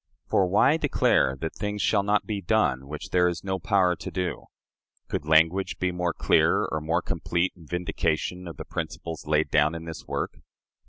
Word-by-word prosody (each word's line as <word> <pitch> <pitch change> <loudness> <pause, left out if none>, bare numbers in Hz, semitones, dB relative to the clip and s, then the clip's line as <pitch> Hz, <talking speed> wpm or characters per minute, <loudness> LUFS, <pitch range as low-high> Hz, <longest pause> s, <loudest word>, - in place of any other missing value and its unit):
For 95 - +2
why 105 - +4
declare 130 - +2
that 80 - -3
things 105 0 -4
shall 105 0 +2
not 105 +1 +1
be 105 -3 -3
done, 65 -6 +1
which 75 +4 -7
there 90 -1 +4
is 85 -1 -3
no 95 -1 -2
power 90 -1 +2
to - - -6
do?" 90 -3 -3 0.6
Could 75 - -4
language 80 +5 +3
be 90 0 0
more 90 -1 -1
clear - - +3
or 80 - -3
more 80 +2 0
complete 85 +2 -1
in 85 -4 -16
vindication 90 +1 -2
of 85 - -8
the - - -7
principles 80 -2 -6
laid 75 -1 +1
down 75 +1 +3
in 80 0 -7
this 80 -1 -8
work? - - -3
90 Hz, 190 wpm, -26 LUFS, 80-95 Hz, 0.6 s, why